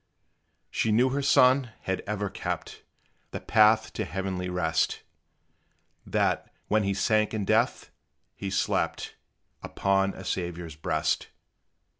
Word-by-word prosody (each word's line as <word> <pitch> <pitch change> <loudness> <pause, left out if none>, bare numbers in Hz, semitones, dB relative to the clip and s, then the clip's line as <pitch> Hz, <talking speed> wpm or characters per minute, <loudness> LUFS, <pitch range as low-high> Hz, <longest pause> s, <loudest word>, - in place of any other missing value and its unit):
She 110 - 0
knew 120 +5 +4
her 140 +2 -1
son 130 -3 +4
had 95 0 -2
ever 105 0 -2
kept - - -5 0.5
The - - -5
path 110 +1 +4
to - - -2
heavenly 95 -1 -3
rest 85 -3 0 1.0
That, - - 0 0.2
when 110 +1 +2
he 100 -1 0
sank 110 +2 +1
in 105 -2 -2
death, - - +1 0.4
he 100 - -5
slept 95 - -1 0.5
Upon 95 0 0
a 95 - -9
Saviour's 85 -4 -4
breast. 80 - -1
100 Hz, 120 wpm, -27 LUFS, 95-110 Hz, 1.0 s, knew